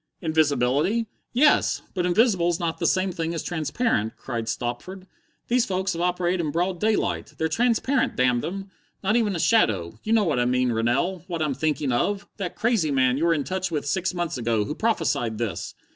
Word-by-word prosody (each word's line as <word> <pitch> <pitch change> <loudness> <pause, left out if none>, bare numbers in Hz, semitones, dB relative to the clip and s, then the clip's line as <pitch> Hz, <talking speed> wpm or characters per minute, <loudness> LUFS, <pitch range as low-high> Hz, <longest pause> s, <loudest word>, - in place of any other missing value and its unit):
"Invisibility? 155 - +1 0.3
Yes! 290 +5 +3
But 180 -2 0
invisible's 175 -4 +2
not 170 -2 -2
the - - +1
same 185 0 +1
thing 165 -1 -3
as 165 - -3
transparent," 155 - -1
cried 115 -3 -4
Stopford. 130 +11 -4 0.4
"These 245 0 +2
folks 190 0 -1
have 170 - -4
operated 180 0 +1
in 150 - -2
broad 175 +3 -1
daylight. 215 +2 0
They're 160 - 0
transparent, 245 - +1
damn 125 -1 +2
them! 195 +2 -5 0.3
Not 205 +3 +2
even 215 -5 +2
a - - -2
shadow! 110 - +2
You 220 - 0
know 225 -2 +4
what 155 -9 +1
I 120 - +2
mean, 125 0 +1
Rennell! 135 +11 0
What 170 -3 -2
I'm 150 -2 0
thinking 145 0 -1
of! 200 +11 0
That 180 -3 -4
crazy 220 -7 +1
man 130 -2 +2
you 165 - +1
were 170 - +4
in 145 - -1
touch 185 +6 -2
with 150 -4 -2
six 175 +6 0
months 175 -7 -3
ago, 115 -3 0
who 150 - -3
prophesied 160 - 0
this! 115 -2 -4
170 Hz, 190 wpm, -24 LUFS, 130-195 Hz, 0.4 s, know